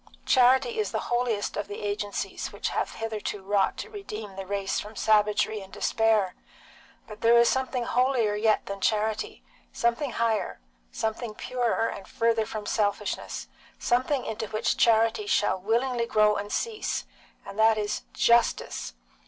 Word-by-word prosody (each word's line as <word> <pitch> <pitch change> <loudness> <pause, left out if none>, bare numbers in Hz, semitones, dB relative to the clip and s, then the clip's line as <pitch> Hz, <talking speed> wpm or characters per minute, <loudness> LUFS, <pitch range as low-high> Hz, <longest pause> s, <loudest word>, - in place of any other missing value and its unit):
Charity 255 -2 +4
is 210 -3 0
the - - -3
holiest 240 -4 0
of 205 - -3
the 205 - -7
agencies 205 0 -3
which - - -3
have - - -2
hitherto 215 -3 -4
wrought 195 0 +1
to - - -6
redeem 215 - -7
the 195 -1 -6
race 200 -1 -1
from 210 +1 -8
savagery 210 0 +2
and 190 0 -12
despair; 220 -5 +2 0.7
but 215 -1 -11
there 235 +1 +6
is 235 0 +6
something 260 -1 0
holier 245 -3 +2
yet 215 +1 +2
than 200 0 -6
charity, 215 +1 0 0.3
something 235 +3 0
higher, 225 - 0 0.3
something 220 0 -3
purer 240 -2 0
and 195 - -7
further 230 -1 +1
from 215 -2 -5
selfishness, 205 -2 -2 0.3
something 255 +2 +1
into 220 0 -4
which 215 +1 0
charity 230 - +3
shall 190 - +2
willingly 235 +3 0
grow 210 -1 +4
and 205 0 -4
cease, 445 -2 -2 0.4
and 200 - -8
that 220 0 +5
is 210 0 -2
justice. 235 - +2
220 Hz, 150 wpm, -27 LUFS, 205-235 Hz, 0.7 s, there